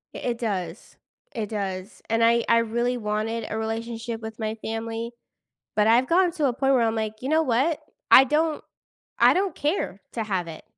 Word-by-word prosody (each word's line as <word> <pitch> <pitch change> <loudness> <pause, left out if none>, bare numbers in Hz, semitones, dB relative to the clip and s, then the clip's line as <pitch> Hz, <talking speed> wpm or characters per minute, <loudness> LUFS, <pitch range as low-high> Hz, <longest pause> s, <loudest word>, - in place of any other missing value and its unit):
I - - -5
it 240 -1 -2
does, 200 -7 -4 0.4
it 215 -3 -3
does, 195 -1 -5
and 225 0 +2
I 235 0 +4
I 230 0 +6
really 235 +2 0
wanted 215 +1 -2
a 220 - -3
relationship 225 +1 -4
with 220 +1 -8
my 220 0 -2
family, 225 +1 -4 0.7
but 210 - +4
I've 235 +3 +4
gotten 350 0 +3
to 300 -3 0
a 255 - +2
point 270 +2 +2
where 245 - +4
I'm 225 0 +1
like, 220 -1 -3
"You 265 - -3
know 315 +1 +3
what? 275 +4 +1 0.3
I 265 - +10
don't 305 +3 0 0.5
I - - +6
don't 380 +1 0
care 290 - -2
to 225 - -2
have 185 -5 -2
it 160 - -9
230 Hz, 195 wpm, -25 LUFS, 220-255 Hz, 0.7 s, I